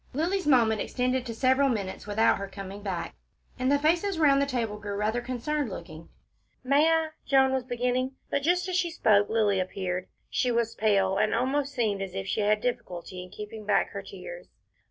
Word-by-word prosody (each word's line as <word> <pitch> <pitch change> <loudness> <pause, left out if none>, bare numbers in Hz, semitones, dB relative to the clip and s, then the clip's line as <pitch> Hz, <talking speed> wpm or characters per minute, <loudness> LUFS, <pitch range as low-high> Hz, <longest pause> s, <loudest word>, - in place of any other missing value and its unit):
Lilly's 350 +5 0
moment 230 -6 +4
extended 255 0 -1
to 230 - -4
several 260 +3 +3
minutes 205 -4 -3
without 210 +1 +3
her 200 - -4
coming 195 0 -8
back, 190 -4 -4 0.5
and 255 +1 +1
the 285 - +5
faces 335 +6 +1
round 280 -3 +4
the 280 - +1
table 230 -6 -2
grew 205 0 -5
rather 215 +4 0
concerned 255 +3 -2
looking. 165 -3 -9 0.5
"May 280 +4 +4
I 320 -1 +2
" - - -45
Joan 265 -1 +5
was 260 -2 -1
beginning, 250 +1 -1 0.2
but 280 - +1
just 355 +5 +1
as 370 - -2
she 360 -1 +1
spoke 205 -10 +3
Lilly 210 -3 +2
appeared. 185 0 -3 0.2
She 250 - 0
was 235 -1 0
pale, 195 -3 +2
and 215 +1 +2
almost 275 +3 0
seemed 215 -5 0
as 190 -1 -5
if 195 0 -3
she 200 +2 -1
had 210 +1 +2
difficulty 185 -6 -4
in 180 - -10
keeping 210 +2 -8
back 205 0 +1
her - - -5
tears. - - -9
235 Hz, 195 wpm, -27 LUFS, 205-275 Hz, 0.5 s, the